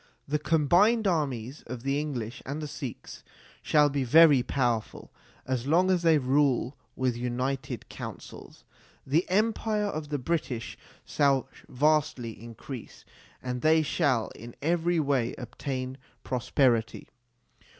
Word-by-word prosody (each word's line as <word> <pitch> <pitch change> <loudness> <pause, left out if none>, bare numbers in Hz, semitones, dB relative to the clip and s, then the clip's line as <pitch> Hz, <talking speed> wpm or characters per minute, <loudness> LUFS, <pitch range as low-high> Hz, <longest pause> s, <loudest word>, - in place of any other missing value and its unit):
The 150 +2 0
combined 175 +10 +3
armies 140 - -1
of 120 0 -7
the 135 +1 0
English 130 -6 -4
and 140 +3 -5
the 150 - -4
Sikhs 135 -4 -8 0.4
shall 150 -1 +4
be 140 -1 -1
very 145 +1 +7
powerful, 120 -4 -2 0.3
as 130 -1 -2
long 180 +5 +3
as 180 -2 +2
they 165 -2 +5
rule 135 -1 +1 0.2
with 130 -2 0
united 125 +1 -3
councils. - - -9 0.4
The 155 +7 +1
empire 215 +1 +1
of 155 -7 -4
the 145 - -1
British 130 -5 -3 0.3
shall 140 -3 +2 0.2
vastly 150 -3 +1
increase, 120 +2 -9 0.4
and 125 -1 -3
they 160 0 +4
shall 140 -7 +1
in 115 +1 -11
every 170 +2 +1
way 140 -5 0
obtain 130 +1 -5 0.2
pros 125 -3 -4
perity. 120 -5 +1
140 Hz, 130 wpm, -28 LUFS, 125-155 Hz, 0.4 s, very